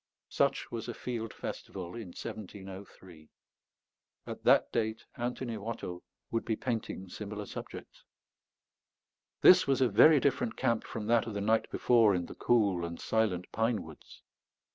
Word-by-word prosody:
Such - - 0
was 115 -1 -5
a 120 - -5
field 115 -3 -4
festival 90 -3 -7
in 115 -4 -7
1703; 95 -4 -9 1.0
at - - -7
that - - +4
date 110 0 -1
Antony 120 -1 -3
Watteau 100 -5 -5 0.3
would 115 - 0
be 110 - -1
painting 110 -6 -4
similar 105 +2 -6
subjects. - - -9 1.4
This 180 - +8
was 135 -1 +2
a 130 - +4
very 150 +9 +7
different 130 -4 0
camp 115 -2 0
from 110 -2 -5
that 115 +1 +2
of 110 - -5
the - - -1
night 110 +2 +2
before 115 -5 +4
in 90 -1 -1
the - - -9
cool 100 -7 +2
and 85 0 -5
silent 105 -6 0
pine 110 -2 0
woods. 80 -2 -14
110 Hz, 145 wpm, -31 LUFS, 95-115 Hz, 1.4 s, This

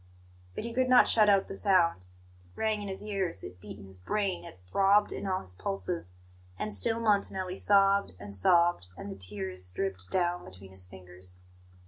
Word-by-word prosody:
But - - -4
he 235 0 -5
could 255 +1 +1
not 250 -1 +7
shut 215 -2 +5
out 195 -1 +4
the 195 - -6
sound; 170 - +2
it 90 0 -23
rang 215 -1 0
in 205 - -5
his 190 +1 -6
ears, 195 - -2
it 90 +1 -10
beat 105 -1 -9
in 100 - -12
his 95 -1 -12
brain, 195 - -1
it 90 - -12
throbbed 195 - +3
in - - -4
all 185 -1 0
his 90 - -9
pulses. 170 - -4 0.4
And 105 - -3
still 165 - +1
Montanelli 200 -4 +1
sobbed 200 0 +4
and 100 0 -8
sobbed, 170 - +3
and 100 - -7
the - - -6
tears 95 -1 -4
dripped 95 0 -3
down 175 -1 0
between 95 +1 -12
his 95 -1 -6
fingers. 90 -1 -9
165 Hz, 190 wpm, -30 LUFS, -, 0.4 s, not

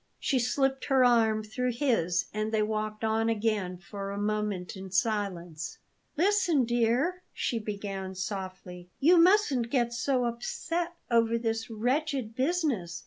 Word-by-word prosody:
She 265 - +1
slipped 270 +2 0
her 265 -3 +4
arm 225 -3 +3
through 250 +3 -2
his, 200 - +1
and 215 +1 -2
they 215 -1 +2
walked 215 0 -3
on 225 +1 +1
again 210 -5 0
for 195 +2 -7
a 200 - -4
moment 205 -3 -2
in 190 0 -8
silence. 185 -5 -2 0.4
"Listen, 350 -6 +3
dear," 240 +10 +1
she 235 - -1
began 200 -3 -5
softly; 185 -2 -6
"you 340 +5 +6
mustn't 335 - +4
get 240 -2 +1
so 250 +1 +1
upset 330 +9 -3 0.2
over 230 0 +3
this 225 -1 -2
wretched 255 +1 -1
business. 260 - 0
225 Hz, 140 wpm, -29 LUFS, 200-260 Hz, 0.4 s, you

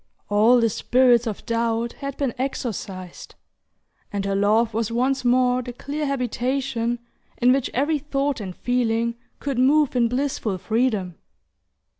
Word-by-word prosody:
All 220 +4 +5
the 230 -1 +3
spirits 240 +1 +3
of 215 - -5
doubt 230 0 -1
had 275 -1 -6
been 270 -5 -1
exorcised, 205 -8 -5 0.8
and 200 -1 -2
her 200 - 0
love 215 +3 +2
was 225 0 -1
once 260 +3 0
more 250 0 +3
the 245 0 -7
clear 290 +4 -4
habitation 250 -2 -1 0.4
in 250 +1 +4
which 270 -2 0
every 290 +4 +1
thought 280 -1 -1
and 185 -3 -6
feeling 235 -2 0 0.3
could 275 -3 -2
move 285 +2 +3
in 240 -1 +3
blissful 250 -5 -1
freedom. 215 -4 -1
240 Hz, 140 wpm, -23 LUFS, 225-265 Hz, 0.8 s, All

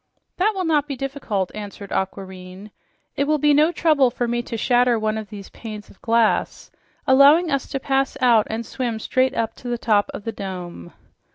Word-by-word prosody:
"That 420 +4 +2
will 375 -1 -2
not 300 -3 +2
be 280 - -4
difficult," 260 -8 -3
answered 205 -1 -8
Aquareine. 190 +1 -5 0.4
"It 280 - +1
will 305 +1 +2
be 295 0 +3
no 305 +3 +4
trouble 305 -7 +3
for 240 +1 -3
me 240 0 -1
to 235 -1 -6
shatter 245 +1 +3
one 215 0 -1
of 220 -1 -6
these 200 -3 -10
panes 215 -3 -9
of - - -22
glass, 230 -1 +1 0.3
allowing 285 +6 +6
us 275 -2 -1
to 270 - -3
pass 270 0 0
out 235 -5 +4
and 225 +1 -3
swim 240 -3 -3
straight 255 +4 0
up 225 -1 -1
to 250 - -9
the 240 0 -1
top 210 -3 +1
of 205 - -8
the 225 - -3
dome." 180 - -7
235 Hz, 195 wpm, -22 LUFS, 210-275 Hz, 0.4 s, allowing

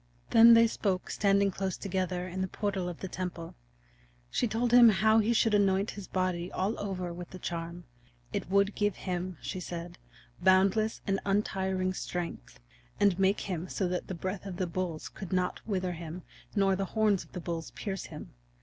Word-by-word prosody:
Then 230 0 +9
they 230 0 +7
spoke 195 -4 -1
standing 200 0 +3
close 190 -1 -3
together 185 -2 -2
in 185 +1 -4
the 190 - 0
portal 190 -2 -2
of 175 - -8
the 190 - -3
temple. 175 -2 -5 0.8
She - - +1
told 230 +2 0
him 240 -1 +9
how 220 +2 +4
he 220 +2 +2
should 225 -1 +3
anoint 200 0 +3
his 200 -3 -8
body 185 -1 -1
all 195 +4 0
over 185 -4 -3
with 175 0 -8
the 185 - -9
charm; 170 0 -5 0.5
it 200 - -3
would 200 +1 +3
give 205 -2 0
him, 180 -1 -4
she 185 - -4
said, 175 0 -6 0.4
boundless 195 +4 +3
and 195 -1 +1
untiring 190 -2 0
strength, 175 - -5 0.4
and 195 -2 +3
make 195 +1 +3
him 180 -2 -4
so 190 - -1
that 180 0 -3
the 185 - -4
breath 190 +3 -4
of 180 -2 -6
the 185 - 0
bulls 170 -2 -3
could 195 - -9
not 180 -1 0
wither 185 -4 -1
him 170 +1 -7 0.3
nor 195 -2 +3
the 195 +1 -1
horns 210 -3 +3
of - - -22
the 180 - -4
bulls 170 -2 -4
pierce 195 -3 -5
him. - - -10
190 Hz, 185 wpm, -30 LUFS, 180-200 Hz, 0.8 s, Then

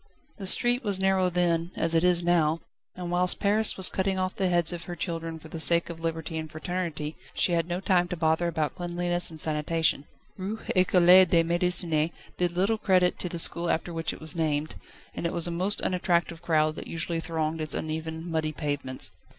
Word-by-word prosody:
The 195 - -4
street 245 +5 +3
was 200 -3 +1
narrow 190 -1 +2
then, 175 -1 0
as 165 0 -1
it 165 0 +2
is 175 -1 +3
now, 165 -2 +1 0.3
and 180 -1 -6
whilst 180 +1 +2
Paris 210 +1 +1
was 190 - +7
cutting 190 0 0
off 185 0 -2
the 190 -2 0
heads 175 -1 +1
of 170 0 -7
her 175 - -6
children 165 -2 -4
for 160 - -13
the 165 - -7
sake 170 +1 +4
of 165 - -10
Liberty 160 -1 -4
and 155 0 -7
Fraternity, 160 -2 -4 0.2
she - - +3
had 165 -1 0
no 175 +1 -3
time 180 -2 +1
to 180 0 -5
bother 160 +1 +1
about 155 -3 -2
cleanliness 175 0 -1
and 160 -1 -10
sanitation. 155 -1 +2 0.3
Rue 200 +3 -5 0.2
Ecole 185 0 +6
de 165 -1 +2
Médecine 170 -2 +3 0.3
did 175 -1 0
little 200 +5 0
credit 185 -3 +2
to 180 - -4
the 170 - -5
school 170 +1 +2
after 165 +2 -2
which 165 -1 -2
it - - -10
was 160 +1 -5
named, 155 -2 -2 0.4
and 170 - -3
it 170 - -5
was 170 -2 0
a 175 - 0
most 185 +4 0
unattractive 175 -2 -1
crowd 155 -2 +1
that - - -7
usually 165 0 -3
thronged 160 -1 -3
its 155 - -3
uneven, 160 +1 -5
muddy 160 -2 -2
pavements. 145 -7 -2
170 Hz, 205 wpm, -26 LUFS, 160-180 Hz, 0.4 s, was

